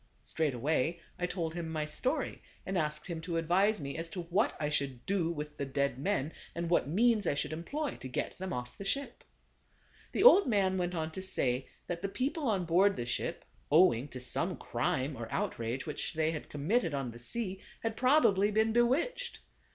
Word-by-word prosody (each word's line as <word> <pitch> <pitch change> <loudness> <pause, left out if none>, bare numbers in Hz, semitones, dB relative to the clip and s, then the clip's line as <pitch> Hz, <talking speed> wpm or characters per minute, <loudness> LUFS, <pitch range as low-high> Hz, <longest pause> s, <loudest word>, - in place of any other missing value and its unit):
Straightway 155 +2 0 0.2
I 180 - 0
told 165 -3 -3
him 170 -1 -4
my 155 -1 -1
story, 150 +11 -1 0.2
and 195 - -3
asked 150 -3 -1
him 170 -3 -4
to 165 0 -2
advise 185 +6 +3
me 140 -2 -5
as 165 0 -4
to 175 +2 -4
what 185 +7 +1
I 150 - 0
should 140 -4 -2
do 185 -4 +1
with 150 -2 -5
the 140 - -2
dead 140 -1 0
men 155 -2 0 0.2
and 170 0 -2
what 170 - +3
means 215 +6 +3
I - - +2
should 145 - -2
employ 280 - -3
to - - -7
get 125 - -3
them 190 0 -4
off 125 -3 -5
the - - -4
ship. 275 +8 -2 0.9
The - - +1
old 405 - +9
man 190 -5 +2
went 175 0 -1
on 160 -1 -2
to 190 - -6
say 130 -9 0 0.2
that 175 -1 -4
the 195 - -2
people 275 +6 -1
on 195 -5 +1
board 190 +4 +4
the 120 - -3
ship, 120 - -3 0.3
owing 145 -6 +5
to 130 - -8
some 125 -1 -1
crime 135 +2 -1
or 115 -2 -7
out - - -1
rage 115 +3 -2
which 155 0 -3
they 160 0 +2
had 155 - -6
committed 160 +3 0
on 135 -3 -2
the 120 - -11
sea, 190 - -3 0.2
had 225 -1 -2
probably 235 -7 +4
been 220 +1 +2
bewitched. 340 - +1
170 Hz, 200 wpm, -32 LUFS, 145-200 Hz, 0.9 s, old